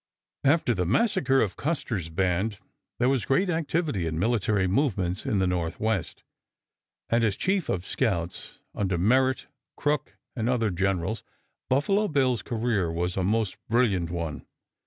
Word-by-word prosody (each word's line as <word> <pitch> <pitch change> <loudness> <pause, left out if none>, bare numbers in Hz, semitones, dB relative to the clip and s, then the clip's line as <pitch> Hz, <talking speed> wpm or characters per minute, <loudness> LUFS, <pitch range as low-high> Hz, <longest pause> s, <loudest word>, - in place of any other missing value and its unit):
After 140 -3 +3
the 90 -4 -1
massacre 135 - +3
of 100 - 0
Custer's 115 - -2
band 95 +4 0 0.4
there 125 - +2
was 135 -3 +2
great 180 +7 +2
activity 160 - -1
in 80 0 -3
military 105 0 +1
movements 95 -4 0
in 105 - +1
the 95 - +2
Northwest, 90 +3 -1 0.9
and 115 0 +3
as 105 -4 +2
chief 190 - 0
of 90 -1 -1
scouts 85 -5 -2 0.2
under 95 -3 -1
Merritt, 130 +8 +2 0.3
Crook, 150 -1 -1 0.2
and 115 -1 -1
other 115 -5 +1
generals 95 +3 -1 0.5
Buffalo 195 +11 +2
Bill's 130 - +1
career 110 -7 0
was 90 +2 -1
a 95 - 0
most 110 +1 0
brilliant 105 -8 +2
one. 85 -4 -4
110 Hz, 140 wpm, -27 LUFS, 90-130 Hz, 0.9 s, After